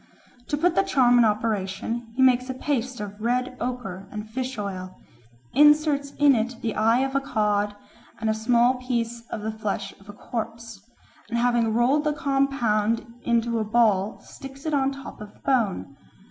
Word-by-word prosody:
To 290 - -1
put 340 +3 +2
the 390 - +4
charm 255 -10 +4
in 235 - +6
operation 215 +1 -2
he 260 - +3
makes 255 0 +4
a 260 - -3
paste 260 -2 -2
of 205 0 -7
red 250 +2 0
ochre 210 -7 -5
and 210 0 -6
fish 255 +2 -4
oil, 185 -3 -5 0.5
inserts 295 -1 +4
in 285 -1 +6
it 240 +1 -1
the 225 -2 -1
eye 225 +3 +3
of 270 0 -1
a 275 - +2
cod 210 -5 0 0.4
and 225 - -2
a 220 - +3
small 240 +3 +2
piece 235 -2 -2
of 215 - -5
the 220 +1 -2
flesh 210 -2 -4
of 195 +1 -18
a - - -8
corpse, 225 -1 -6 0.5
and 235 - -1
having 235 -2 +2
rolled 260 +6 +3
the 300 - +2
compound 270 -6 +1 0.2
into 235 -1 +1
a - - 0
ball 215 -2 +2
sticks 270 +1 -12
it 310 - -1
on 270 -1 +2
the 275 - -7
top 235 - -10
of 210 -1 -10
the - - -24
bone. 220 - 0
235 Hz, 185 wpm, -25 LUFS, 215-260 Hz, 0.5 s, in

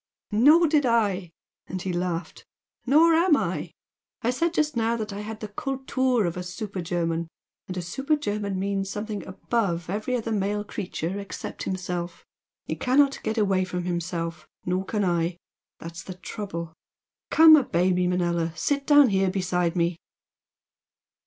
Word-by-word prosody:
"Nor 295 +11 +6
did 300 -2 +3
I!" 205 -7 +1 0.4
and 185 - -4
he 185 0 -3
laughed 175 -1 -3 0.4
"Nor 320 +5 +6
am 330 -1 +5
I. - - -2 0.5
I 235 - +2
said 330 +7 0
just 305 -2 +1
now 230 0 +1
that 215 -2 -4
I 200 - -5
had 215 +1 -7
the 215 - -4
'Kultur' 260 -1 0
of 170 - -2
a 180 - -4
super 185 +2 -5
German 170 -1 -1 0.4
and 185 - -5
a 180 - -2
super 270 - 0
German 205 -8 -2
means 195 0 -1
something 210 0 -4
above 185 -3 -2
every 215 +5 -1
other 225 -2 -2
male 205 0 0
creature 190 -2 -4
except 200 - -6
himself. 180 -2 -4 0.4
He - - -3
cannot 270 +2 +3
get 220 - -2
away 195 -3 +2
from 180 -1 -3
himself 170 -2 -3 0.2
nor 185 +2 -1
can 210 0 -1
I! 170 -1 0 0.4
That's 165 0 -8
the 185 - -8
trouble! 180 -4 -6 0.6
Come, 320 0 +9
obey 185 - +2
me, 180 0 +1
Manella! 170 -2 0
Sit 280 - -1
down 290 -3 +7
here 190 -1 +2
beside 180 -2 0
me!" 170 -1 0
195 Hz, 160 wpm, -26 LUFS, 180-235 Hz, 0.6 s, Come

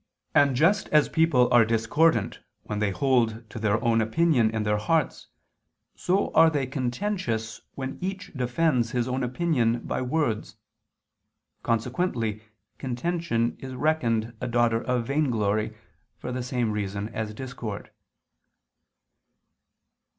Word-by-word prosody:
And 140 -2 +4
just 185 +9 +3
as 150 -1 +3
people 160 -7 +3
are 120 -1 +7
discordant 115 +3 +1 0.2
when 105 -1 -4
they 105 -1 +1
hold 115 -1 +1
to - - -6
their 110 0 +1
own 115 -1 +3
opinion 120 0 +2
in 110 -1 -2
their 105 0 +1
hearts, 155 +9 0 0.7
so 190 +3 0
are 160 +1 +7
they 145 -4 -1
contentious 125 - -3
when 130 -1 -5
each 190 +1 -5
defends 125 -1 +1
his 120 -1 0
own 130 +1 -1
opinion 125 -4 +1
by - - -3
words. 125 -5 -1 1.1
Consequently 115 - -1 0.4
contention 130 -2 -1
is 130 -1 -7
reckoned 120 -7 0
a 125 - -2
daughter 120 -1 +2
of 125 -2 0
vainglory 110 -6 0 0.4
for 125 - -6
the 125 0 -3
same 125 -3 -1
reason 100 0 -3
as 110 -1 -4
discord. 120 -5 -6
125 Hz, 125 wpm, -26 LUFS, 110-145 Hz, 1.1 s, are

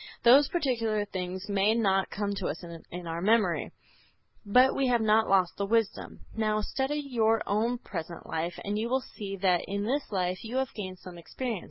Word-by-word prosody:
Those 265 +4 +7
particular 230 -10 0
things 185 0 -5
may 205 +2 +2
not 195 -4 +2
come 205 -1 -2
to 195 -2 -3
us 165 - -5 0.3
in 175 0 -7
our 165 0 -4
memory, 205 -3 +2 0.7
but 250 +5 +4
we 270 - +1
have 245 -1 +3
not 220 +1 +3
lost 185 -2 +3
the 200 - -1
wisdom. 225 -1 -1
Now, 215 -1 +1
study 265 +6 -2
your 225 -6 +1
own 225 +4 0
present 170 -6 -7
life 165 +2 -3
and 205 +1 -1
you 230 +2 -2
will 260 +1 +1
see 200 -5 -7
that 185 -2 +2
in 200 +1 -3
this 265 +5 -2
life 185 -2 -1
you 230 +2 -6
have 265 -1 -1
gained 185 -3 -6
some 180 -1 -11
experience. 230 +5 -4
210 Hz, 190 wpm, -29 LUFS, 185-235 Hz, 0.7 s, Those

